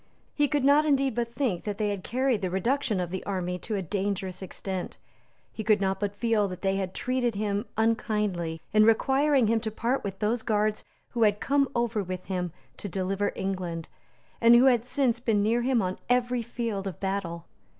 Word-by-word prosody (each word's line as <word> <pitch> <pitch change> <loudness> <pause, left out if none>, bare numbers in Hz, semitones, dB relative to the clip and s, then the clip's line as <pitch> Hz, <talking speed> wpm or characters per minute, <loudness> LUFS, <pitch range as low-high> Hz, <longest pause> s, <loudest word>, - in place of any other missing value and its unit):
He 295 -1 +2
could 290 -2 0
not 285 +2 +5
indeed 275 -3 +2
but 235 0 -2
think 230 -12 -1
that 205 -1 -3
they 210 0 0
had 200 -3 -3
carried 255 -2 0
the 185 - -1
reduction 230 +3 0
of 175 -1 -3
the 190 - -4
army 180 -2 -2
to 215 - -3
a 195 - -2
dangerous 190 0 -2
extent. 190 0 -5 0.6
He 220 - -5
could 215 -1 +4
not 190 -1 0
but 205 0 -2
feel 220 -1 +1
that 180 0 -8
they 195 0 +1
had 190 -1 -3
treated 250 -3 0
him 205 0 -1
unkindly 210 -7 0
in 215 0 +6
requiring 265 +4 +4
him 225 +1 +2
to 220 0 -3
part 235 +5 -1
with 195 -1 -4
those 220 +3 0
guards 215 -1 0 0.3
who 235 - -3
had 210 -2 +4
come 280 0 +2
over 235 -2 0
with 185 -1 -5
him 180 -2 -3 0.3
to 205 - -5
deliver 195 +2 -1
England, 180 -4 -3 0.5
and 230 +1 +8
who 245 +2 +6
had 245 -3 +4
since 250 -3 +1
been 220 -4 +1
near 230 +3 +2
him 245 -3 +2
on 185 0 -3
every 245 0 +2
field 230 -4 -3
of 185 - -6
battle. 190 -4 -3
210 Hz, 200 wpm, -27 LUFS, 190-240 Hz, 0.6 s, and